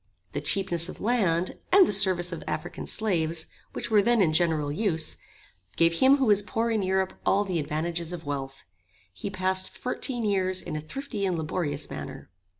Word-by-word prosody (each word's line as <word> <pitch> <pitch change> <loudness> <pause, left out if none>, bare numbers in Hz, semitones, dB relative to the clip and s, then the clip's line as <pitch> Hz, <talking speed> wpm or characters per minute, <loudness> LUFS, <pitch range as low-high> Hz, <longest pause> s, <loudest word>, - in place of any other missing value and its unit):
The 145 - -3
cheapness 170 +1 -1
of - - -9
land, 190 -7 +1
and 385 0 +8
the - - 0
service 185 -3 +4
of 170 - -6
African - - -4
slaves, 165 -7 0 0.3
which - - -5
were 210 -1 +6
then 235 +3 +3
in 165 -6 +3
general 160 -3 +1
use, 165 -2 +1 0.6
gave 165 0 +3
him 270 +2 +6
who 270 - +1
was 205 -3 +5
poor 225 +3 -1
in 220 -2 +1
Europe 190 0 0
all 200 +1 +3
the 185 -4 -2
advantages 165 +3 -2
of 175 -3 -7
wealth. 135 -1 -5 0.5
He 145 - -5
passed 185 -1 +1
fourteen 250 -1 -2
years 185 -2 +1
in 155 - -5
a 155 - -3
thrifty 235 - -5
and 185 -3 0
laborious 155 -2 -2
manner. - - -8
185 Hz, 180 wpm, -27 LUFS, 160-205 Hz, 0.6 s, and